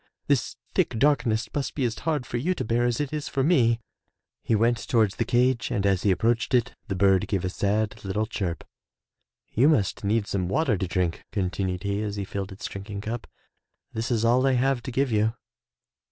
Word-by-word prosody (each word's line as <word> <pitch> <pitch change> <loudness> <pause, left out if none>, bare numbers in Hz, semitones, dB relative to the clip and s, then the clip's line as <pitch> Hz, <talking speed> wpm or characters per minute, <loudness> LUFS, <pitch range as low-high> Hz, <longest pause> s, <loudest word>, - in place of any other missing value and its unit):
This - - +1 0.2
thick - - +1
darkness 125 -4 +2
must 140 -2 -2
be 140 - -1
as 115 -2 -2
hard 150 -5 -1
for 120 - -3
you 175 +10 0
to 130 - -3
bear 120 +2 +1
as 120 -1 0
it 145 0 -2
is 150 -1 -3
for 135 - 0
me.'' 120 -8 +3 0.6
He 115 - +1
went 115 +2 +3
towards 110 -4 +2
the 115 - 0
cage 125 +1 +2
and 100 - -1
as 95 -2 +2
he 105 - +2
approached 115 +6 +2
it 125 0 +1
the 95 - -2
bird 95 -1 +3
gave 95 -3 -1
a 90 - -1
sad 105 +2 0
Uttle 105 +3 -3
chirp. 85 -6 -3 0.9
"You 130 +7 +4
must 105 - +1
need 105 +1 +1
some 95 -3 -2
water 135 -2 +2
to 95 0 -2
drink," 90 -1 -1
continued 95 -1 -2
he 100 +1 -1
as 105 -1 -3
he 100 -1 -3
filled 100 0 -5
its 95 - -8
drinking 100 +1 -6
cup. 110 +2 -5 0.7
"This 115 +3 -2
is 115 -2 +1
all 125 +3 +4
I 135 - +3
have 130 0 +2
to 130 - -6
give 135 +1 +1
you." 110 +1 +2
110 Hz, 210 wpm, -26 LUFS, 100-125 Hz, 0.9 s, You